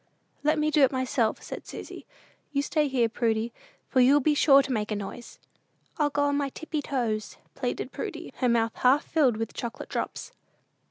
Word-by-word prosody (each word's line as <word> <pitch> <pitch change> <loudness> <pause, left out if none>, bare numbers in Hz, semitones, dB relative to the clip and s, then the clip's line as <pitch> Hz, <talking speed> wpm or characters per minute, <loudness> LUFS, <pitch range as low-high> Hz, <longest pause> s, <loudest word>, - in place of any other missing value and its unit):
"Let 305 +1 +3
me 305 0 +1
do 300 - +3
it 270 - +6
myself," 255 -3 0
said - - -8
Susy: - - -9 0.4
"you 280 -1 0
stay 300 0 +1
here, 255 -4 +2
Prudy, 225 0 -1 0.3
for 260 - +1
you'll 275 +4 +6
be 300 +2 +2
sure 275 -2 +6
to 270 - -4
make 215 -3 -1
a 215 - -1
noise." 205 +4 -7 0.6
"I'll 295 -1 +3
go 290 0 0
on 285 0 +2
my 285 -1 0
tippy 310 +2 -4
toes," 230 -7 -2 0.2
pleaded - - -3
Prudy, 345 -9 -6
her 250 - +1
mouth 230 -1 +2
half 265 +4 +4
filled 270 -8 +2
with 225 0 -4
chocolate 235 -1 -6
drops. - - -4
265 Hz, 185 wpm, -27 LUFS, 230-290 Hz, 0.6 s, it